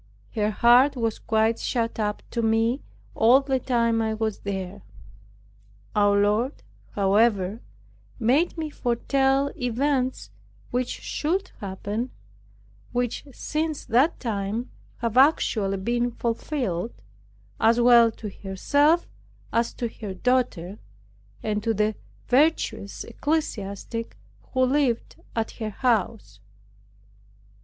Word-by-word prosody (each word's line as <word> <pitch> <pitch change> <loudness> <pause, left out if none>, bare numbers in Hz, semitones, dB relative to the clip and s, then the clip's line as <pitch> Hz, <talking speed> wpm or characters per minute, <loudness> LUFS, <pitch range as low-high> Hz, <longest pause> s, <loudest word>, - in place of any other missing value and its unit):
Her 210 -1 +1
heart 245 +6 +5
was 230 -3 -1
quite 220 0 +1
shut 230 -2 -1
up 210 -1 -1
to 235 - -1
me 225 +4 +2 0.3
all 240 +4 +6
the 270 -1 -1
time 230 -2 +1
I 220 -1 0
was 220 -1 -2
there. 195 0 -5 1.1
Our 205 -1 +4
Lord, 215 +7 +1 0.3
however, 200 0 +2 0.6
made 285 +10 +2
me 315 -2 -3
foretell 270 +3 +1
events 255 - -1 0.4
which 250 0 0
should 370 +5 -2
happen, 205 +5 -4 0.8
which 245 +2 -2
since 310 +3 -3
that 255 +8 +2
time 220 +1 -3 0.3
have 230 0 -1
actually 220 -8 +3
been 240 +5 0
fulfilled, 230 - -3 0.6
as 230 +2 +4
well 235 -1 +7
to 220 -1 -7
herself 285 - +1 0.5
as 230 0 +1
to 240 - -2
her 210 -4 -7
daughter, 210 -5 0 0.6
and 210 -1 -1
to 225 +1 0
the 210 +1 +1 0.3
virtuous 270 -7 +1
ecclesiastic 230 -5 -3 0.3
who 260 -1 +2
lived 260 -3 0 0.2
at 225 -1 -1
her 220 -2 -5
house. 215 - -1
230 Hz, 110 wpm, -25 LUFS, 210-255 Hz, 1.1 s, well